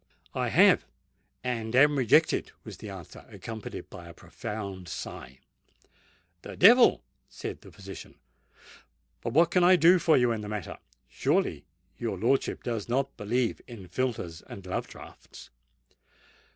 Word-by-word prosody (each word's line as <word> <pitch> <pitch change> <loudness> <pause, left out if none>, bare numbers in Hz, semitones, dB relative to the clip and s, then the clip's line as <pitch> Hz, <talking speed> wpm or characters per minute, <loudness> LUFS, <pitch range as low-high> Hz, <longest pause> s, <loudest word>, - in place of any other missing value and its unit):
"I - - -1
have—and 120 -2 0
am 145 +3 +6
rejected," 130 -5 +3
was - - -9
the - - -9
answer, - - -10
accompanied 110 -2 -8
by 85 -1 -10
a 85 - -13
profound 100 -6 -7
sigh. 65 -4 -8 1.0
"The - - -9
devil!" 235 +6 +6 0.3
said - - -7
the - - -14
physician. - - -11 1.1
"But 115 - -4
what 165 +3 +4
can 180 0 +3
I 185 +1 +7
do 175 +1 +6
for 165 -2 +4
you 125 -2 +3
in 110 -2 -2
the 105 - -7
matter? 105 -5 -6 0.3
Surely 65 - -1 0.3
your 115 -2 -3
lordship 130 +4 0
does 115 -3 -4
not 135 +3 -1
believe 115 +3 -1
in 110 -7 -10
philtres 110 -9 -3
and 100 - -10
love 90 - -3
draughts?" - - -13
115 Hz, 140 wpm, -28 LUFS, 105-135 Hz, 1.1 s, I